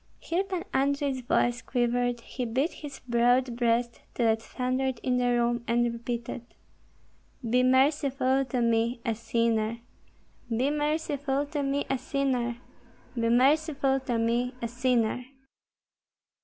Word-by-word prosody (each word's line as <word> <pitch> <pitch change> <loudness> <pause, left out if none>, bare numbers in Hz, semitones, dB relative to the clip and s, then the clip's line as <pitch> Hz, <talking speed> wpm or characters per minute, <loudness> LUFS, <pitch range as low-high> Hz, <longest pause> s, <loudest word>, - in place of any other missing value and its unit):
Here 345 +3 -1
Pan 375 -3 -4
Andrei's 275 0 +1
voice 240 0 +1
quivered; 245 -1 0
he 255 - -5
beat 260 +8 0
his 285 -3 -9
broad 245 +1 +3
breast 235 0 0
till 235 -2 +2
it 220 0 -1
thundered 255 +1 -2
in 250 -1 +1
the 250 0 +1
room, 240 -1 +1
and 240 0 +2
repeated, 235 0 -4 1.1
"Be 250 +2 +3
merciful 270 0 +3
to 250 -1 -2
me, 230 +1 +1
a 230 - +1
sinner! 230 0 0 0.7
be 245 +5 +1
merciful 295 -2 -1
to 290 0 -3
me, 275 +1 0
a 270 -1 -1
sinner! 260 -3 -1 0.6
Be 230 -2 0
merciful 275 +2 +3
to 250 -3 -2
me, 240 +2 0
a 235 - -2
sinner!" 245 0 0
250 Hz, 130 wpm, -28 LUFS, 235-275 Hz, 1.1 s, broad